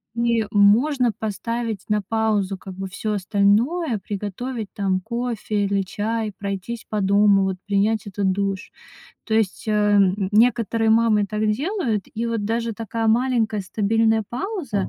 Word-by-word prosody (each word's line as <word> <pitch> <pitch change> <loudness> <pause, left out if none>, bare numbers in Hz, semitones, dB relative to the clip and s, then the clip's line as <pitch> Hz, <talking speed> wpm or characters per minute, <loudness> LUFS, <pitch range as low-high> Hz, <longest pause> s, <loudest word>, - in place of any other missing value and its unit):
и 235 -2 +1
можно 235 +5 +4
поставить 220 0 -3
на 210 0 +2
паузу 210 -2 0
как 190 - -9
бы 195 +1 -5
всё 215 +3 -3
остальное. 215 - +1
Приготовить 210 +3 -5
там 190 -2 0
кофе 225 -2 -2
или 200 0 +1
чай, 215 +3 -2
пройтись 200 +3 -5
по 210 -1 -1
дому, 200 0 +4
вот 190 -1 -1
принять 210 +2 +1
этот 195 -1 0
душ, 195 0 -2 0.6
то 220 - -2
есть, 220 -4 0
э, - - +2
н 205 -2 +3
некоторые 225 0 +3
мамы 220 -2 +3
так 215 +2 -1
делают, 260 - -1
и 230 +2 -2
вот 230 -3 -2
даже 230 0 -1
такая 225 0 -2
маленькая 230 -3 +1
стабильная 220 +2 +1
пауза, 260 - -3
215 Hz, 145 wpm, -22 LUFS, 200-230 Hz, 0.6 s, можно